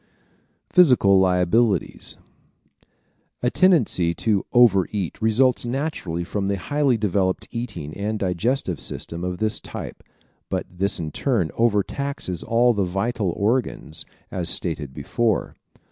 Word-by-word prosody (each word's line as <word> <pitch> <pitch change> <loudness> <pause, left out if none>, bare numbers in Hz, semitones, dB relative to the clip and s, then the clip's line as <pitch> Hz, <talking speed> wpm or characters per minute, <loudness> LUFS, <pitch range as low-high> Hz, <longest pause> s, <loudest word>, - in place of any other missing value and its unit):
Physical 125 - +6
Liabilities 95 +4 +1 0.7
¶ - - -37 0.6
A 125 - +2
tendency 120 - +3
to 105 +1 +1
over 110 -7 +5
eat 100 -1 -4
results 120 +3 +3
naturally 120 - -3
from 100 +2 -3
the 100 0 0
highly 140 +5 +1
developed 95 -3 0
eating 90 -11 -5
and 105 +2 -2
digesting 95 - -1
system 85 +4 -5
of 90 0 -3
this 110 +2 0
type - - -8 0.5
but - - -2
this 95 +3 -2
in 80 -2 -4
turn 110 - 0
overtaxes 115 - -1
all 120 +1 +3
the 100 -3 0
vital 100 +3 -1
organs, 105 -7 -1 0.3
as 90 -2 -2
stated 80 -6 -3
before. 110 - -1
100 Hz, 125 wpm, -23 LUFS, 90-120 Hz, 0.7 s, Physical